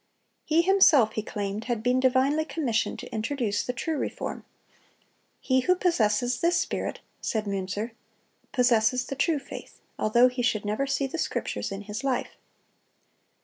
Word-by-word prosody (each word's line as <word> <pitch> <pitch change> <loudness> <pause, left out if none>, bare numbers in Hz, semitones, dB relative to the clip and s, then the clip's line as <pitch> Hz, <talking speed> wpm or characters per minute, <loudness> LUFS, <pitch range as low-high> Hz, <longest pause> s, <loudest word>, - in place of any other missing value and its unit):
He 320 +2 +3
himself, 335 - +5
he 215 - -2
claimed, 205 +1 -4
had 235 -3 -2
been 250 +1 +2
divinely 265 +4 +3
commissioned 265 -8 -1
to - - -9
introduce 225 -2 -1
the - - -2
true 305 +5 -3
reform. - - -4 0.9
"He 260 -1 +2
who 365 +8 +3
possesses 245 - +1
this 345 +1 +2
spirit," - - -2 0.2
said 220 -3 -1
Münzer, 200 +3 -3 0.6
"possesses 250 0 +3
the 275 - -5
true 305 +4 +1
faith, 275 - -10 0.2
although 235 +4 +5
he 250 0 -3
should 220 -4 0
never 215 +7 -1
see 275 0 0
the 300 +5 -4
Scriptures - - -2
in 195 0 -5
his 210 +3 -6
life." 265 -2 -1
250 Hz, 150 wpm, -27 LUFS, 215-275 Hz, 0.9 s, himself